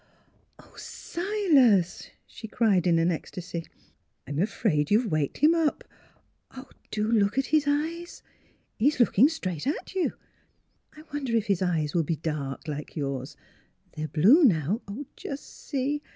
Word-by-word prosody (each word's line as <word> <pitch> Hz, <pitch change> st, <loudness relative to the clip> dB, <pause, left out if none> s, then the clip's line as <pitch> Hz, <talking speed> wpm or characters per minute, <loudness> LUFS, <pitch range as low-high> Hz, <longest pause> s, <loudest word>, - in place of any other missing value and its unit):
" -, -, -39 dB
Oh, -, -, -19 dB
Silas!" 310 Hz, -, +1 dB, 0.2 s
she 220 Hz, -, -10 dB
cried 205 Hz, -5 st, +2 dB
in 170 Hz, -1 st, +4 dB
an 165 Hz, +2 st, +2 dB
ecstasy. 170 Hz, 0 st, -6 dB, 0.6 s
"I'm 145 Hz, +2 st, -4 dB
afraid 180 Hz, -6 st, 0 dB
you've 215 Hz, +1 st, +2 dB
waked 155 Hz, -3 st, -1 dB
him 310 Hz, +3 st, +5 dB
up!... 325 Hz, -3 st, 0 dB, 1.1 s
Do 215 Hz, +1 st, -1 dB
look 210 Hz, 0 st, +2 dB
at 270 Hz, -, +2 dB
his 305 Hz, -2 st, +4 dB
eyes!... 325 Hz, +4 st, -2 dB, 0.6 s
He's 280 Hz, +5 st, +2 dB
looking 240 Hz, +3 st, +5 dB
straight 185 Hz, -, -4 dB
at 305 Hz, +6 st, -3 dB
you.... 375 Hz, -2 st, 0 dB, 0.8 s
I 305 Hz, -, -11 dB
wonder 270 Hz, -5 st, -2 dB
if 220 Hz, -2 st, +1 dB
his 200 Hz, -4 st, 0 dB
eyes 165 Hz, -5 st, 0 dB
will 170 Hz, -, +2 dB
be 160 Hz, +1 st, -1 dB
dark 150 Hz, -2 st, -4 dB
like 150 Hz, -1 st, -6 dB
yours? 135 Hz, -3 st, -4 dB, 0.5 s
They're 155 Hz, 0 st, -5 dB
blue 210 Hz, -, +5 dB
now 190 Hz, -, +2 dB, 0.3 s
just 280 Hz, 0 st, -7 dB, 0.2 s
see! 285 Hz, +1 st, -1 dB
210 Hz, 145 wpm, -27 LUFS, -, 1.1 s, him